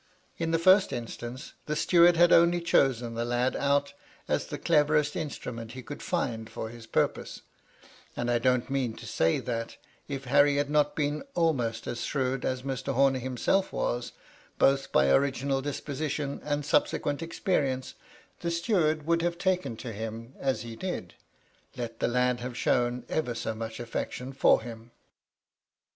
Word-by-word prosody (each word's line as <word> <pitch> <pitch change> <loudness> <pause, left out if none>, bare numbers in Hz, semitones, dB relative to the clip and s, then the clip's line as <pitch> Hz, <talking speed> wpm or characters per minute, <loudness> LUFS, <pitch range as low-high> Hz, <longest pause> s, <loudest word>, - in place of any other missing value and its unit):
In 165 -1 -1
the 165 - +2
first 185 +4 +5
instance; 120 +2 -6
the 150 - -1
steward 170 +1 +5
had 175 0 +6
only 170 +1 +5
chosen 130 -8 +2
the 115 +1 -2
lad 120 +2 0
out 140 0 +1 0.3
as - - 0
the - - -5
cleverest 150 -2 +2
instrument 120 -7 -5
he 130 -1 -8
could 145 +4 -8
find 115 -10 -2
for 110 - -5
his 115 -1 -11
purpose; - - -1 0.7
and 120 0 0
I 120 - +2
don't 125 0 +2
mean 130 -4 -1
to - - -10
say 80 0 +1
that, 115 -1 -4 0.3
if 135 -2 -5
Harry 145 +3 +4
had 145 0 0
not 150 -1 +2
been 150 0 -1
almost 125 -9 0
as 120 0 -4
shrewd 135 -1 -1
as 130 -1 -2
Mr. 135 0 -3
Homer 135 0 +3
himself 130 +10 0
was, 120 0 -2 0.4
both 135 0 +3
by 70 0 +4
original 135 - +2
disposition 145 0 -3
and 145 -1 -2
subsequent 145 0 +1
experience, 150 -6 -1 0.5
the 170 - -2
steward 170 -3 +1
would 170 +1 +2
have 170 0 -1
taken 180 - 0
to 120 - -6
him 115 +3 -6
as 135 -2 -1
he 115 -1 -7
did, 115 - -5 0.6
let 115 -2 -5
the - - +1
lad 125 0 +1
have 125 0 -6
shown 120 0 +1
ever 125 -7 -1
so 110 - -3
much 110 0 -6
afiection 125 +2 -5
for 130 - +4
him. 115 0 -9
135 Hz, 160 wpm, -28 LUFS, 120-150 Hz, 0.7 s, had